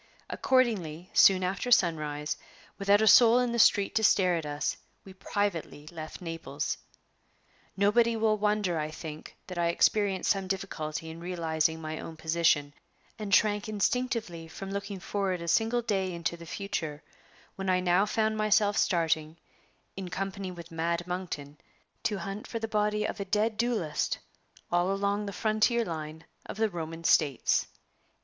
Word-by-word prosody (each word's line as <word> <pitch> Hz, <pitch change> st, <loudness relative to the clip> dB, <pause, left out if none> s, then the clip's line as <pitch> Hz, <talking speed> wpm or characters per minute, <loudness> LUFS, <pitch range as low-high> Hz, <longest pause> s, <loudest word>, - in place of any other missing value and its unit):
Accordingly, 200 Hz, -, +1 dB
soon 185 Hz, -1 st, +6 dB
after 195 Hz, +7 st, -2 dB
sunrise, 155 Hz, -8 st, +2 dB, 0.4 s
without 200 Hz, +2 st, +4 dB
a -, -, +3 dB
soul 235 Hz, +1 st, +8 dB
in 250 Hz, -1 st, +1 dB
the 235 Hz, -, -1 dB
street 200 Hz, -2 st, +4 dB
to 220 Hz, -, +1 dB
stare 185 Hz, -4 st, +4 dB
at 160 Hz, -3 st, -3 dB
us, 145 Hz, 0 st, -2 dB, 0.3 s
we 190 Hz, -, -11 dB
privately 185 Hz, -6 st, -3 dB
left 155 Hz, 0 st, -8 dB
Naples. 165 Hz, -4 st, -3 dB, 1.0 s
Nobody 230 Hz, +4 st, +3 dB
will 220 Hz, -1 st, +2 dB
wonder, 210 Hz, -5 st, 0 dB
I 155 Hz, 0 st, -2 dB
think, 155 Hz, -1 st, -9 dB
that 180 Hz, -2 st, -6 dB
I 170 Hz, -, +2 dB
experienced 195 Hz, +2 st, +2 dB
some 195 Hz, -2 st, -1 dB
difficulty 160 Hz, -5 st, -4 dB
in 165 Hz, -, -9 dB
realizing 160 Hz, -2 st, -1 dB
my 155 Hz, 0 st, -5 dB
own 160 Hz, -, -8 dB
position, 160 Hz, -3 st, +1 dB, 0.5 s
and 210 Hz, -2 st, -5 dB
shrank 210 Hz, +2 st, +3 dB
instinctively 215 Hz, -5 st, -1 dB
from 195 Hz, +4 st, -8 dB
looking 200 Hz, 0 st, -4 dB
forward 195 Hz, -1 st, -2 dB
a 170 Hz, -, -6 dB
single 225 Hz, +6 st, +2 dB
day 195 Hz, -4 st, 0 dB
into 170 Hz, 0 st, -3 dB
the 170 Hz, -1 st, -12 dB
future, 160 Hz, -6 st, -4 dB, 0.5 s
when 195 Hz, -1 st, -3 dB
I 185 Hz, 0 st, +3 dB
now 180 Hz, +3 st, +3 dB
found 220 Hz, 0 st, +1 dB
myself 215 Hz, -1 st, +2 dB
starting, 160 Hz, -2 st, +1 dB, 0.6 s
in 190 Hz, -2 st, -6 dB
company 195 Hz, +1 st, -4 dB
with 170 Hz, -1 st, -10 dB
"Mad 170 Hz, +1 st, -1 dB
Monkton," 170 Hz, -5 st, -5 dB, 0.5 s
to 210 Hz, -, +1 dB
hunt 195 Hz, +3 st, -6 dB
for 230 Hz, -, -4 dB
the 225 Hz, 0 st, -3 dB
body 210 Hz, 0 st, 0 dB
of -, -, -4 dB
a 200 Hz, -, -3 dB
dead 210 Hz, +3 st, +1 dB
duelist 220 Hz, -9 st, -1 dB, 0.5 s
all 175 Hz, +2 st, +2 dB
along 200 Hz, +1 st, -1 dB
the -, -, -3 dB
frontier 220 Hz, +3 st, +1 dB
line 160 Hz, -2 st, -6 dB, 0.2 s
of -, -, -7 dB
the 220 Hz, 0 st, +2 dB
Roman 165 Hz, -2 st, -6 dB
States! 145 Hz, -5 st, +2 dB
190 Hz, 155 wpm, -29 LUFS, 165-210 Hz, 1.0 s, soul